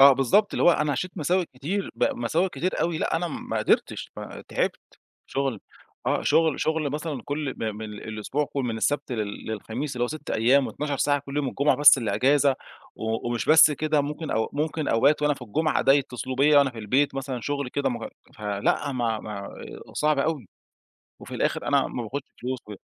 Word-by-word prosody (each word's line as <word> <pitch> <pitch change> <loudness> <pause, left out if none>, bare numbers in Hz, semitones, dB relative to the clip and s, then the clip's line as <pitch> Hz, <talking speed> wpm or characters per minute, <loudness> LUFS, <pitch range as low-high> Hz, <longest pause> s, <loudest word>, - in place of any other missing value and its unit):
آه، 140 0 +10
بالضبط 135 - +3
اللي - - 0
هو 175 - +7
أنا 150 -3 +1
عِشت 175 +8 -2
مساوئ 175 +3 +1
كتير، 180 +10 -3
ب - - +1
مساوئ 190 -6 0
كتير 180 +1 -2
أوي. 165 -1 0
لأ، - - 0
أنا 175 +1 -2
ما - - -4
قدرتش، - - 0
ما - - -8
تعبت - - -1 0.5
شغل 135 -6 -2 0.5
آه، - - +1
شغل 160 -2 +2
شغل 160 -3 0
مثلًا 150 -4 -4
كُل 145 -1 -3
م 110 -2 -3
من 110 - -6
الأسبوع 110 +8 -3
كُل، 140 - 0
من 115 -2 -2
السبت 145 +2 -1
لل 105 -3 -4
للخميس، 120 +6 -4
اللي 120 - -1
هو - - +3
6 155 0 -7
أيام 130 +5 +3
12 145 -1 -3
ساعة 145 +1 +2
كل 140 +1 -6
يوم، 140 -3 0
الجمعة 140 -1 +2
بس 145 -2 +8
اللي 110 -4 -1
اجازة 140 +4 +3 0.4
و 110 +1 -2
ومش 120 -1 -2
بس 155 0 +8
كده، 150 0 +1
ممكن 150 +2 -4
أو 110 0 0
ممكن 155 +1 -2
أوقات 140 +6 +3
وأنا 150 -1 +3
في 125 - -12
الجُمعة 155 +8 0
ده 135 +2 +5
اتصلوا 130 -1 -5
بيّا 145 +2 +6
وأنا 140 -2 +4
في 115 - -11
البيت 130 +7 +1
مثلًا 135 -2 -4
شغل 140 0 -2
كده 140 +1 -1
مه 120 -3 -4 0.3
فلأ، 105 +7 -1
ما 115 -3 -1
ما 105 -2 -6
آآ، 100 - -10
صعب 150 -1 +1
أوي 140 - -1 0.7
وفي - - -8
الآخر - - -1
أنا - - +3
ما 120 - -4
باخدش 135 +5 -5
فلوس 130 0 -3
و - - -9
140 Hz, 205 wpm, -25 LUFS, 120-150 Hz, 0.7 s, آه